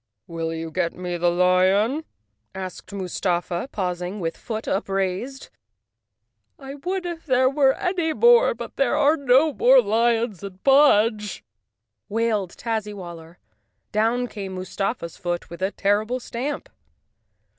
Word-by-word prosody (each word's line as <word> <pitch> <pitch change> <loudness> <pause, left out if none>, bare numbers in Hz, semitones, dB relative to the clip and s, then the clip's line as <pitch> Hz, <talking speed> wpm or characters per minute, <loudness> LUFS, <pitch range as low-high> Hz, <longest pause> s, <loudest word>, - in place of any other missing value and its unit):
"Will 165 -2 -4
you 165 0 -5
get 170 0 -1
me 180 -1 -4
the 175 0 +2
lion?" 185 - +2 0.5
asked 185 -1 -7
Mustafa, 180 +1 -2
paus¬ 180 -3 -2
ing 185 +4 -5
with 165 -2 -3
foot 220 -1 -6
upraised. 195 +6 -2 1.1
"I 270 -1 -9
would 360 +6 -4
if 335 -2 -6
there 255 -1 +4
were 270 0 +3
any 355 -3 -1
more, 475 +7 +5
but - - -8
there 275 0 +2
are 300 +1 +4
no 280 +1 +3
more 260 +1 +6
lions 225 -2 +1
in 195 -2 -7
Mudge!" 225 -7 +4 0.7
wailed 215 -4 -1
Tazzy 220 -3 -3
waller. 170 -2 -10 0.5
Down 230 +4 +1
came 195 -5 -7
Mustafa's 185 -1 -4
foot 175 -1 -4
with 170 - -9
a 190 - +1
terrible 210 +5 0
stamp. 255 +4 -4
210 Hz, 135 wpm, -23 LUFS, 185-260 Hz, 1.1 s, more